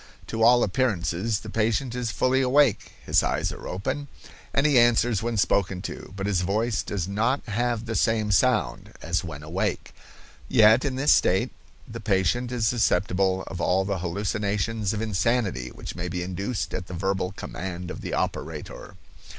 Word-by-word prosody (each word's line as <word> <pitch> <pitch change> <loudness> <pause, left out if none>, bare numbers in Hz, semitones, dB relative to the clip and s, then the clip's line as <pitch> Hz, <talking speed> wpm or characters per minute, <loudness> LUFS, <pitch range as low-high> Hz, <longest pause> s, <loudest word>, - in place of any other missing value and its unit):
To 115 - -4
all 120 +2 +6
appearances, 100 - 0
the 110 - -8
patient 115 +3 0
is 125 -2 -2
fully 130 +4 +2
awake, 135 -2 +2
his - - +4
eyes - - -1
are - - -8
open, 130 +10 -3 0.4
and 135 - +2
he 145 -4 +5
answers 120 -2 +3
when 115 0 -2
spoken 95 -1 +1
to, - - -7
but 100 0 -4
his 100 -3 +1
voice 110 +5 0
does 95 -4 -3
not 115 +7 0
have 120 +1 -1
the 115 - -3
same 110 -1 +1
sound 125 +3 +1
as 85 +3 -1
when 75 -3 -7
awake. 85 +5 -3 0.6
Yet, 110 +1 +6
in 135 -2 -1
this 140 +3 +3
state 95 +1 +3 0.4
the 115 - -7
patient 110 +4 +1
is 120 -3 0
susceptible 95 -4 +1
of 90 - -6
all 95 +1 +2
the 95 -1 -2
hallucinations 100 +3 -1
of 110 0 -2
insanity 100 - 0
which - - -8
may 85 +1 -3
be 90 +1 -3
induced 100 +4 -3
at 90 - -4
the 90 - -6
verbal 95 0 -1
command 90 -2 -6
of - - -7
the - - -3
operator. 95 - -4
105 Hz, 170 wpm, -25 LUFS, 95-120 Hz, 0.6 s, all